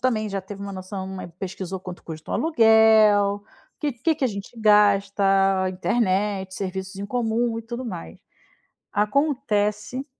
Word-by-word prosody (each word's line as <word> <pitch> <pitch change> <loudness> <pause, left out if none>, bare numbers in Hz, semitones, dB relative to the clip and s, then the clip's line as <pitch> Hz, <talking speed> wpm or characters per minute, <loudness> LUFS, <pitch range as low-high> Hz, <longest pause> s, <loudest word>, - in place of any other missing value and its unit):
também 220 -5 0
já 195 0 -2
teve 200 +1 -9
uma 200 0 -6
noção 190 0 -6 0.3
pesquisou 190 -1 -5
quanto 180 -1 -9
custa 160 -1 -9
o - - -1
aluguel, 220 -7 +4 0.3
que 295 -3 -1
que 310 +7 0
que 285 - -2
a - - +4
gente 200 +3 -8
gasta, 195 -2 +3
internet, 190 -1 0
serviços 190 0 -5
em 200 +1 -5
comum 230 0 -1
e - - -6
tudo 235 +3 -6
mais. 85 - -7 0.7
Acontece 215 0 0
205 Hz, 140 wpm, -24 LUFS, 195-230 Hz, 0.7 s, aluguel